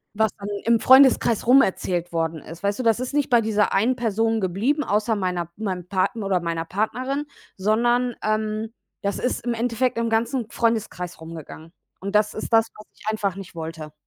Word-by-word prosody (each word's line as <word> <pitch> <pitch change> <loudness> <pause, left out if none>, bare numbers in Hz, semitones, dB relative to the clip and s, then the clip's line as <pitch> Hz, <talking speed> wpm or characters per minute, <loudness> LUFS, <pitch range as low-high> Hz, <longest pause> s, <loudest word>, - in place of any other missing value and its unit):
was 220 -1 +2
dann 200 - -7 0.2
im 230 0 +4
Freundeskreis 260 -4 +5
rumerzählt 185 -8 +3
worden 165 -1 -1
ist. 165 +4 -11
Weißt 200 0 0
du, 255 - -3
das 225 0 +3
ist 255 +2 -4
nicht 285 -3 +1
bei 240 - +6
dieser 215 -1 +1
einen 230 +6 +2
Person 225 -1 0
geblieben, 220 - 0
außer 215 +1 +1
meiner 180 -3 -2
meinem 185 -4 -4
Partner 200 +3 -1
oder 185 -2 +2
meiner 165 -1 -3
Partnerin, 255 - -2 0.3
sondern, 240 +4 +1
ähm, 215 +1 -1 0.3
das 200 -2 -1
ist 250 - -1
im 240 -1 -1
Endeffekt 240 +1 0
im 230 0 0
ganzen 230 +1 0
Freundeskreis 220 -6 -1
rumgegangen. 160 0 -10 0.3
Und 200 +2 -5
das 210 0 +3
ist - - -5
das, 225 0 +5
was 215 - -13
ich - - -18
einfach 205 -4 -1
nicht 195 -3 -10
wollte. 160 -2 -7
215 Hz, 185 wpm, -23 LUFS, 185-235 Hz, 0.3 s, bei